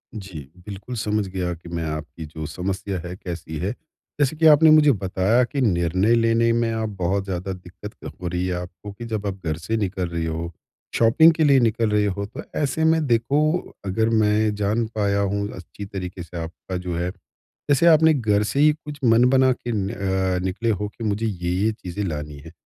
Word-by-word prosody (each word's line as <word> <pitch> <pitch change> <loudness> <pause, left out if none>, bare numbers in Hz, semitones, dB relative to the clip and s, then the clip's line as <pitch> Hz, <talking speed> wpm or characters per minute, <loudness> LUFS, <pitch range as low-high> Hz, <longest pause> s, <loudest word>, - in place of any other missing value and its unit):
जी, 95 -6 -7 0.3
बिल्कुल, 105 +5 -7
समझ 105 -2 -1
गया 90 -2 -3
कि 85 0 -12
मैं 85 -1 -3
आपकी 80 +1 -5
जो 80 +1 -7
समस्या 95 +3 -3
है 85 +2 -7
कैसी 85 -4 -6
है, 95 +5 -1 0.5
जैसे 145 +1 +2
कि 160 +1 +1
आपने 155 +1 +7
मुझे 155 -1 +7
बताया 100 +2 +1
कि 135 +3 -2
निर्णय 95 +1 +2
लेने 115 0 +3
में 115 0 +1
आप 110 -1 -2
बहुत 95 +2 0
ज़्यादा 95 0 -3
दिक्कत 90 +3 -10
क - - -6
हो 90 - -3
रही 90 +1 -1
है 90 - -1
आपको 90 +3 -9
कि 110 +4 -9
जब 110 -3 -4
आप 100 - -1
घर 80 -1 -1
से 100 +7 -2
निकल 95 -3 -2
रहे 85 -1 -3
हो, 80 +1 -3 0.4
शॉपिंग 140 +9 +6
के 160 0 +1
लिए 140 -3 +5
निकल 115 -1 +1
रहे 105 0 +2
हो 100 0 -2
तो 130 +9 -8 0.2
ऐसे 150 +2 0
में 160 -1 +3
देखो 145 +8 +1
अगर 110 +4 +1
मैं 110 -1 +2
जान 105 +3 0
पाया 100 -1 +1
हूँ 100 0 0
अच्छी 95 +3 -9
तरीके 90 -2 -6
से 85 +1 -9
आपका 90 +3 -6
जो 90 -1 -4
है, 85 +2 -2 0.6
जैसे 145 +3 +4
आपने 160 -1 +6
घर 105 -7 +1
से 125 +6 -2
ही 150 +1 +6
कुछ 150 -1 -10
मन 120 0 +5
बना 130 0 +4
के 120 -1 -4
अ, 95 -3 -1
निकले 100 +5 -1
हो 105 -1 0
कि 110 +3 -10
मुझे 105 +1 -1
ये-ये 95 +1 0
चीज़ें 100 -2 -6
लानी 75 -3 -5
है। 80 - -10
100 Hz, 205 wpm, -23 LUFS, 90-115 Hz, 0.6 s, आपने